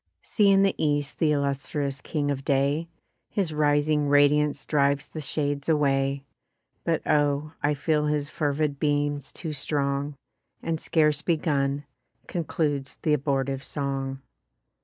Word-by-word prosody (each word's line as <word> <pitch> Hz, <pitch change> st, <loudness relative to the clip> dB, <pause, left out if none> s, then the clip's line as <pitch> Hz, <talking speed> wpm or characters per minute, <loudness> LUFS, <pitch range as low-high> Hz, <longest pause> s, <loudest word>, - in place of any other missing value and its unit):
See 205 Hz, -3 st, +3 dB
in 195 Hz, 0 st, +5 dB
the 195 Hz, -, +3 dB
East 145 Hz, -1 st, 0 dB
th' 160 Hz, -, +3 dB
illustrious 140 Hz, -1 st, -1 dB
king 145 Hz, -2 st, -1 dB
of 135 Hz, -1 st, -3 dB
day! 140 Hz, +4 st, +1 dB, 0.4 s
His 185 Hz, -6 st, -1 dB
rising 150 Hz, 0 st, +2 dB
radiance 145 Hz, 0 st, +3 dB
drives 140 Hz, -1 st, +1 dB
the 155 Hz, -, -7 dB
shades 145 Hz, 0 st, -2 dB
away. 140 Hz, -2 st, +1 dB, 0.6 s
But -, -, 0 dB
oh! 145 Hz, 0 st, +1 dB
I 145 Hz, +1 st, +2 dB
feel 150 Hz, +1 st, +1 dB
his 150 Hz, -1 st, 0 dB
fervid 145 Hz, -1 st, -1 dB
beams 145 Hz, -1 st, 0 dB
too 160 Hz, -3 st, -5 dB
strong, 140 Hz, 0 st, -1 dB, 0.5 s
And 165 Hz, -1 st, -2 dB
scarce 150 Hz, -2 st, +2 dB
begun, 145 Hz, -4 st, 0 dB, 0.4 s
concludes 150 Hz, -5 st, -2 dB
th' -, -, 0 dB
abortive 135 Hz, -1 st, 0 dB
song. 135 Hz, -1 st, -3 dB
145 Hz, 130 wpm, -26 LUFS, 140-150 Hz, 0.6 s, in